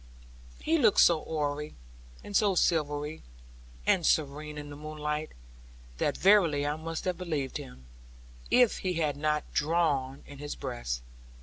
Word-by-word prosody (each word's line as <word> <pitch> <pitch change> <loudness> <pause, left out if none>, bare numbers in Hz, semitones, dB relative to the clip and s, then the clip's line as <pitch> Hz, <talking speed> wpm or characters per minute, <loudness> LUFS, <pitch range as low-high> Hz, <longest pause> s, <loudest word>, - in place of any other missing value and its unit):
He 325 +1 +2
looked 220 -7 +4
so 165 -3 +5
hoary, 150 -1 -3 0.5
and 205 - -7
so 200 -2 +4
silvery, 150 -3 0 0.6
and 175 - +3
serene 150 0 0
in 145 0 -7
the - - -7
moonlight, 150 0 -4 0.7
that - - 0
verily 175 -8 +4
I 145 +1 0
must 160 +1 -5
have 180 -2 -1
believed 155 -7 -2
him, 65 0 -11 0.6
if 245 -3 +4
he 185 -1 -1
had 155 -4 0
not 150 +1 -1
drawn 145 -4 0
in 140 -1 -12
his 145 0 -5
breast. 120 - -4
150 Hz, 140 wpm, -29 LUFS, 145-170 Hz, 0.7 s, so